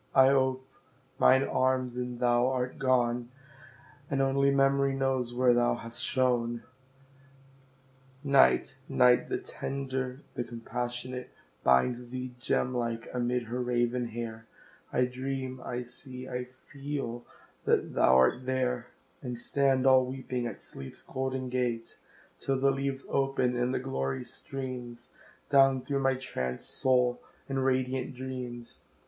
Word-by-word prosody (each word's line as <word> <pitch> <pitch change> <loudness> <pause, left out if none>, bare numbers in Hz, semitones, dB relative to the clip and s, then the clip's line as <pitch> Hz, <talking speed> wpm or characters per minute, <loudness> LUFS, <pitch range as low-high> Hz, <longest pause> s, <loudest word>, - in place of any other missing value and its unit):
I 130 0 +8
ope 130 -1 +2 0.5
mine 130 +1 +6
arms, 130 -2 +1
and 125 -1 -4
thou 120 0 +3
art 130 +1 -2
gone, 125 -2 +2 0.8
And 140 - 0
only 135 +1 +3
Memory 140 0 +3
knows 135 -2 0
where 125 0 +4
thou 120 0 +3
hast 115 0 -3
shone. 120 -2 +1 1.6
Night 140 -1 +4
Night 125 -1 +4
the - - 0
tender, 130 -1 -4
the 120 - -2
compassionate, 120 +2 -4 0.3
Binds 120 - +3
thee, 130 0 -5
gem 125 0 0
like, 115 -2 -2
amid 125 0 0
her 120 +2 -3
raven 120 0 0
hair; 115 -1 -6 0.4
I 125 - +3
dream 130 0 -4
I 125 0 -3
see 125 +1 -10
I 125 -1 -3
feel 130 -1 -6 0.4
that - - +2
thou 65 - +5
art 65 - +4
there 125 -2 0 0.3
And 125 -3 -5
stand 135 +1 +1
all 130 -1 +6
weeping 130 -2 -3
at 110 - -7
Sleep's 70 -1 -10
golden 130 0 -3
gate, 125 -2 -2 0.4
Till 135 -1 0
the 135 +1 +4
leaves 135 0 -3
open, 135 -2 +1
and 125 +1 +1
the - - 0
glory 130 - -2
streams 125 -2 -7 0.4
Down 135 -2 +5
through 140 +1 -1
my 135 -1 +2
trancèd 65 - -4
soul 125 -1 +1 0.3
in 135 -1 -1
radiant 130 0 0
dreams. 125 -2 -6
125 Hz, 130 wpm, -30 LUFS, 120-130 Hz, 1.6 s, I